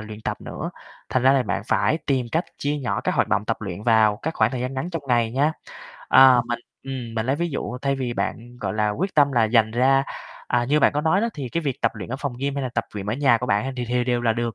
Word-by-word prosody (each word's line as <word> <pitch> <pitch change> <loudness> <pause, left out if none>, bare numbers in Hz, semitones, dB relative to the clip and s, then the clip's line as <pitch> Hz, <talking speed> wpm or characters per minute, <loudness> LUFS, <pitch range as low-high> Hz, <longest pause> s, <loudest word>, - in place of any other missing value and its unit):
luyện 110 0 -9
tập - - -4
nữa, - - -6 0.4
thành 130 - 0
ra 130 +1 +6
là 135 -2 +3
bạn 100 - -2
phải 160 - +2
tìm 130 -3 +1
cách 165 +3 +1
chia 145 +1 -1
nhỏ 135 -4 -2
các - - -1
hoạt - - +1
động 100 - +1
tập 115 - -1
luyện 100 -2 -6
vào 110 -2 +4
các 160 +1 -2
khoảng 110 0 +2
thời 125 -1 -4
gian 130 +2 -3
ngắn 150 +7 -3
trong 165 -4 -4
ngày 120 -2 +2
nha. 145 +5 +2 0.6
Ơ, 130 -2 +7
mình, 120 - -1 0.2
ừm, 130 -4 -6
mình 110 0 -2
lấy 135 +2 +1
ví 170 +2 -2
dụ 125 -3 -4
thay 140 0 +1
vì 125 -2 -2
bạn, 120 +1 -4
gọi - - -2
là, 105 -1 +1
quyết 185 - -3
tâm 145 -2 +4
là 120 -3 +3
dành 110 0 +3
ra, 130 +4 +3 0.4
à, 120 -1 +1
như 145 +5 +2
bạn - - +4
có 145 - 0
nói 160 +5 +2
đó, 230 - +1
thì 140 -4 -5
cái 170 +8 -2
việc 140 -5 -3
tập 115 - +3
luyện - - -7
ở 130 - -3
phòng 140 -4 -4
gym, 140 +1 -2
hay 140 - -2
là 130 - -2
tập 115 - 0
luyện 100 -1 -5
ở 105 - -1
nhà 130 -3 +3
của 125 - -3
bạn 125 +4 0
thì 125 - -2
thì 125 0 +1
đều 120 -1 0
là 115 -2 +3
được. 120 0 -2
125 Hz, 290 wpm, -23 LUFS, 115-140 Hz, 0.6 s, Ơ